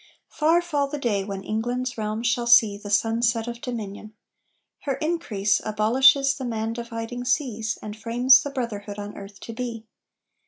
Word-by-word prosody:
Far 330 +3 +2
fall 295 -5 0
the 295 - -5
day 220 -8 0
when 195 -1 -6
England's 245 +4 -2
realm 215 +1 -3
shall 235 0 0
see 225 -3 +6
The 205 0 -9
sunset 225 +2 +1
of 235 0 -6
dominion! 215 -3 -6 0.6
Her 275 -2 -2
increase 250 - 0
Abolishes 260 +6 +4
the 270 - -7
man 225 -2 -2
dividing 235 +1 -5
seas, 230 -5 -1
And 210 -1 -6
frames 240 +4 +5
the 285 - -4
brotherhood 215 -6 -5
on 205 0 -7
earth 195 0 -11
to 230 - -7
be! 230 -2 -5
230 Hz, 160 wpm, -24 LUFS, 215-255 Hz, 0.6 s, see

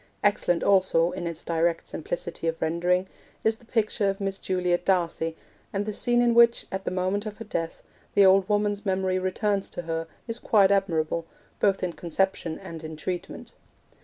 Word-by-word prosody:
Excellent 200 -4 +2
also, 185 -4 +3
in 175 - -4
its 170 0 -5
direct 165 0 0
simplicity 165 +1 -4
of 165 0 -1
rendering, 175 +3 +1 0.4
is 220 0 +2
the 235 - -20
picture 215 -3 +1
of 195 - -3
Miss 195 -1 -2
Juliet 180 -1 0
D'Arcy; 165 -3 0 0.3
and 200 +1 -1
the 215 - -3
scene 240 +3 +2
in 240 -1 +3
which, 235 0 +5
at 190 0 -4
the - - 0
moment 185 +3 -1
of 210 - -7
her 225 - -8
death, 165 -5 -4 0.3
the 200 -1 +7
old 190 +1 +5
woman's 205 0 +1
memory 190 -2 0
returns 195 +2 -1
to 175 - -5
her 165 0 -3 0.2
is 230 0 -3
quite 200 -3 +4
admirable, 165 -4 +1 0.3
both 195 -2 +2
in 180 -2 -1
conception 170 -1 -1
and 165 -4 -9
in 155 0 -6
treatment. 175 +3 -5
190 Hz, 180 wpm, -26 LUFS, 170-205 Hz, 0.4 s, the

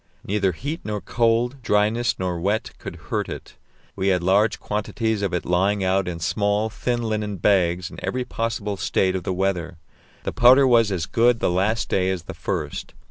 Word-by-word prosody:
Neither 100 -2 0
heat 145 - -5
nor 105 -1 -3
cold, 120 +4 0
dryness 110 +1 +1
nor 90 -2 -2
wet, 100 +5 -1
could - - -7
hurt - - -3
it; - - -8 0.4
we 95 0 -1
had 90 -2 +2
large 100 +4 +3
quantities 110 +1 -2
of 100 -3 -1
it 90 - -2
lying 95 +3 +1
out 95 0 +1
in 85 -2 -4
small, 105 +5 0
thin 120 +2 -2
linen 105 -2 -2
bags 90 -1 +2
in - - -10
every 125 0 -2
possible 115 -4 -3
state 95 +1 +1
of 95 - -2
the - - -1
weather: 90 -2 -1 0.5
the - - -2
powder 130 +3 +6
was 115 -4 +4
as 85 -4 -1
good 115 +5 +3
the - - +1
last 100 +5 +1
day 95 -1 +1
as 95 -3 -2
the - - -8
first. - - -4
105 Hz, 190 wpm, -23 LUFS, 95-115 Hz, 0.5 s, powder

